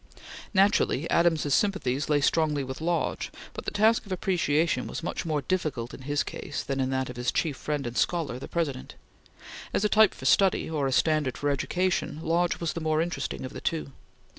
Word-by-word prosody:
Naturally, 195 -6 +3
Adams's 160 -4 +3
sympathies 155 -10 +1
lay 145 -1 +3
strongly 150 -1 +2
with 130 +2 -6
Lodge, 170 +1 -1 0.2
but - - -7
the - - 0
task 220 +2 +3
of - - -10
appreciation 170 -4 +1
was - - -5
much 170 - -3
more 150 -3 0
difficult 140 -8 -2
in - - -9
his 145 +2 0
case 145 - -5
than 135 -1 -3
in 130 -1 +1
that 130 -1 -1
of 125 - -11
his 125 0 0
chief 155 -5 0
friend 145 -1 -3
and 120 0 -5
scholar, 155 -7 0
the - - -7
President. 145 -7 -3 0.8
As 210 - +1
a - - +3
type 215 -1 +5
for - - -10
study, 195 -2 +4
or 150 -4 -1
a - - -1
standard 150 -2 +2
for 145 0 0
education, 180 +3 -1
Lodge 170 +1 +1
was 170 -2 -2
the 170 - -4
more 155 0 +1
interesting 170 -4 -2
of 130 - -7
the - - -7
two. 160 -4 -2
155 Hz, 200 wpm, -27 LUFS, 135-175 Hz, 0.8 s, type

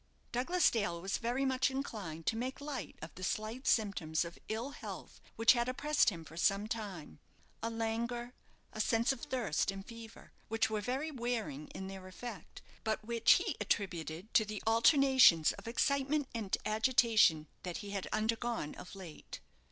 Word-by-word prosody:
Douglas 345 +9 +3
Dale 205 -7 -1
was 190 +3 -2
very 245 +4 0
much 260 0 +2
inclined 205 - -5
to 225 - +1
make 255 +4 -3
light 285 -2 -5
of 160 - -8
the 185 - -9
slight 220 +8 -3
symptoms 180 -7 +1
of 170 - -9
ill 230 +6 -2
health - - -9
which 225 +2 +6
had 240 0 0
oppressed 295 +3 +3
him 165 -5 -7
for 160 - -12
some 195 +3 +2
time 200 - -6 0.4
a 230 - -1
languor, 235 +2 -2 0.4
a 215 - -1
sense 230 +3 +2
of 265 -3 -4
thirst 225 -10 -1
and 195 0 -4
fever, 230 -1 -11 0.2
which 225 0 +1
were 215 -1 -1
very 265 +8 -2
wearing 235 - -3
in 190 - -7
their 190 -1 -8
effect, 195 0 -9 0.2
but 220 -1 -1
which 235 0 +5
he - - 0
attributed 175 -1 -2
to 220 - +6
the 210 -1 -6
alternations 235 - +6
of 200 - -10
excitement 280 +4 +1
and 220 -5 -1
agitation 220 -8 +4
that 180 -2 -4
he 200 - -6
had 200 -2 -3
undergone 225 -5 -1
of 180 - -10
late. 180 -6 -9
225 Hz, 165 wpm, -34 LUFS, 195-245 Hz, 0.4 s, which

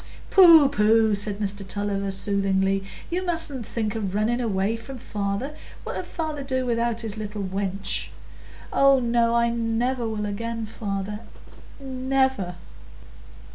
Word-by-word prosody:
"Pooh, 335 -6 +9
pooh," 220 -3 +3
said 205 0 0
Mr 200 -1 -3
Tulliver, 200 0 -2
soothingly, 195 0 +1 0.3
"you 360 +2 -1
mustn't 325 - -2
think 220 -2 -2
o' - - -1
running 215 +4 0
away 205 -1 0
from 255 +4 -8
father. 210 +5 -3 0.3
What - - -5
'ud 360 - -4
father 310 -4 -4
do 260 -1 -1
without 235 -1 0
his 220 -2 -3
little 210 -1 -4
wench?" 195 0 -2 0.7
"Oh 275 -1 +5
no, 235 -1 +2
I 235 0 +3
never 235 +1 -1
will 210 -1 -3
again, 225 +2 -3
father—never." 225 +3 -3
225 Hz, 130 wpm, -25 LUFS, 200-255 Hz, 0.7 s, Pooh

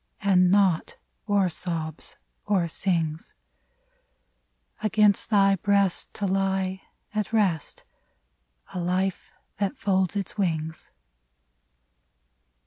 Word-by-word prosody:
And 185 -2 +4
naught 190 -4 +2 0.3
or 200 -2 +3
sobs 165 -2 -4 0.3
or 190 -5 +2
sings: 165 -2 -2 1.5
Against 210 -1 +3
thy 195 -2 +4
breast 200 -1 +1
to 205 - -2
lie 190 0 0 0.3
at 210 -3 -2
rest 195 -8 0 0.4
— - - -27
A - - -5
hfe 180 +2 0 0.4
that 205 +7 -1
folds 190 -4 +1
its 200 +1 -4
wings. 160 -4 -2
190 Hz, 95 wpm, -26 LUFS, 170-200 Hz, 1.5 s, And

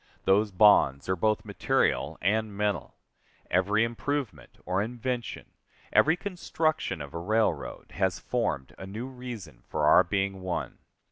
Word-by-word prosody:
Those 105 +3 +4
bonds 90 -9 +5
are 95 - +2
both 110 +4 0
material - - 0
and 105 +1 0
mental. 105 -2 -1 0.6
Every 100 +5 +3
improvement 130 +3 -3
or 90 +2 0
invention, 120 +2 -4 0.4
every 160 +3 +5
construction 160 - -2
of 70 - -11
a 85 - -3
railroad, 100 -4 -1
has 95 -2 0
formed 65 0 -2
a 95 - -7
new 110 +5 -5
reason 120 - -8
for - - 0
our - - +7
being 95 +1 -1
one. 90 -1 -4
105 Hz, 135 wpm, -28 LUFS, 95-120 Hz, 0.6 s, our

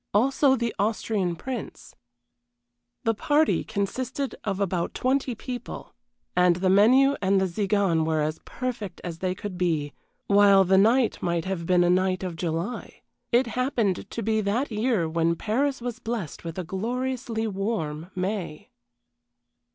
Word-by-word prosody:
Also 265 +4 +4
the 235 -2 -2
Austrian 205 -3 0
Prince. 250 +4 -7 1.1
The 225 - +2
party 295 +8 +2
consisted 255 +7 -3
of 195 -2 -2
about 185 -3 -1
twenty 260 -1 0
people 245 +2 -7 0.4
and 180 -1 +4
the 185 +1 +1
menu 255 +8 +5
and 195 0 +3
the 190 - +2
Tziganes 190 -2 +1
were 160 0 0
as 155 +1 -1
perfect 235 -7 -5
as 170 -2 -6
they 185 0 -1
could 185 -2 -6
be, 155 -5 0 0.3
while 200 -1 +6
the 190 +1 +4
night 230 +4 +3
might 170 -1 -1
have 185 -3 -3
been 180 -1 +4
a 175 - +3
night 185 0 +1
of 180 -3 -4
July 170 +6 -4 0.3
it 245 +2 +4
happened 235 -5 -1
to 230 - -4
be 220 +1 +1
that 225 +7 -1
year 215 -5 +1
when 165 +1 +1
Paris 260 - -1
was 245 -1 -4
blessed 225 - -5
with 165 0 -6
a 185 - -2
gloriously 235 +4 -2
warm 190 -6 -3
May. 185 -4 -4
200 Hz, 150 wpm, -26 LUFS, 180-240 Hz, 1.1 s, while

